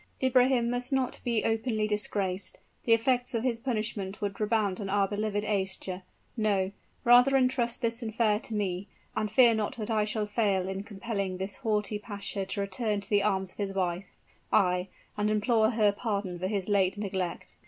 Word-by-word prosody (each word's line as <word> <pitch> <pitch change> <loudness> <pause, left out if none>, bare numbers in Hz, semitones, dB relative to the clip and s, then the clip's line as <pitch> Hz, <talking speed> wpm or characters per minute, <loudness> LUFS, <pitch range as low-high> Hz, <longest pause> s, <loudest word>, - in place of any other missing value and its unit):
"Ibrahim 255 -2 +4
must 245 +1 -2
not 265 -2 0
be 235 -3 +1
openly 225 -1 0
disgraced: 200 -2 -1 0.3
the 230 - +1
effects 245 +2 +2
of 230 - 0
his 240 -3 0
punishment 215 -5 -3
would 200 0 -3
redound 210 -3 +1
on 195 - -4
our 200 0 +2
beloved 205 0 -1
Aischa. 190 -2 -2 0.3
No 200 -4 +1 0.3
rather 245 +3 +6
intrust 255 -3 +1
this 230 +1 +1
affair 220 -2 +1
to 225 - -6
me; 195 -1 -2 0.3
and 215 - 0
fear 240 0 +6
not 220 0 -2
that 220 0 -3
I 215 -1 +2
shall 215 0 -1
fail 205 -3 +1
in 190 0 -3
compelling 200 -2 -4
this 190 +2 -4
haughty 210 -1 -1
pasha 200 -2 -4
to 200 - -2
return 205 +2 -1
to - - -8
the 205 -1 +4
arms 190 -2 0
of - - -20
his 200 -1 -2
wife 180 -1 -2 0.4
ay, 180 0 +3 0.3
and 210 0 +1
implore 220 +1 +3
her 215 -3 +3
pardon 200 -4 -3
for 185 - -1
his 195 -2 -2
late 200 -1 +2
neglect." 190 -4 -4
210 Hz, 180 wpm, -29 LUFS, 195-230 Hz, 0.4 s, rather